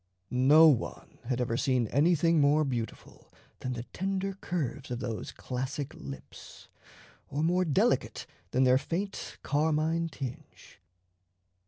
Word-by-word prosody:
No 145 +6 +7
one 140 -7 -1
had 125 0 -1
ever 120 -2 0
seen 130 -2 +1
anything 165 +2 +3
more 145 +2 +4
beautiful 120 -5 -5 0.3
than 130 - -3
the 120 -1 -5
tender 195 +1 -2
curves 155 -7 -4
of 125 - -2
those 115 -3 -4
classic 130 +2 -4
lips, 70 -1 -11 0.6
or 145 +3 -2
more 180 +3 +2
delicate 150 -5 +1 0.2
than 130 +6 +2
their 130 0 +5
faint 190 +7 -4
carmine 160 +2 +1
tinge. 130 -5 -9
145 Hz, 125 wpm, -29 LUFS, 125-165 Hz, 0.6 s, No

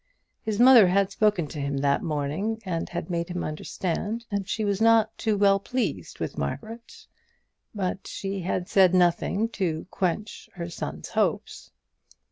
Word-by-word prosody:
His 215 -1 -3
mother 245 -5 +8
had 195 +2 +2
spoken 210 -4 +2
to 150 - -7
him 140 0 -2
that 140 0 +1
morning, 155 +9 -2
and 170 -3 -3
had 175 +1 -5
made 170 0 -2
him 180 0 -3
understand 195 +8 -3
that 200 -1 -2
she 220 - -1
was 200 0 -1
not 225 -1 +5 0.2
well 200 -2 +4
pleased 205 - -3
with - - -4
Margaret; 220 - -6 0.7
but 190 -1 -3
she 195 0 -4
had 180 0 -2
said 185 -2 +4
nothing 180 +4 +2
to 175 -8 -2
quench 195 +3 -3
her 170 -1 -5
son's - - -6
hopes. - - -1
195 Hz, 150 wpm, -26 LUFS, 170-215 Hz, 0.7 s, mother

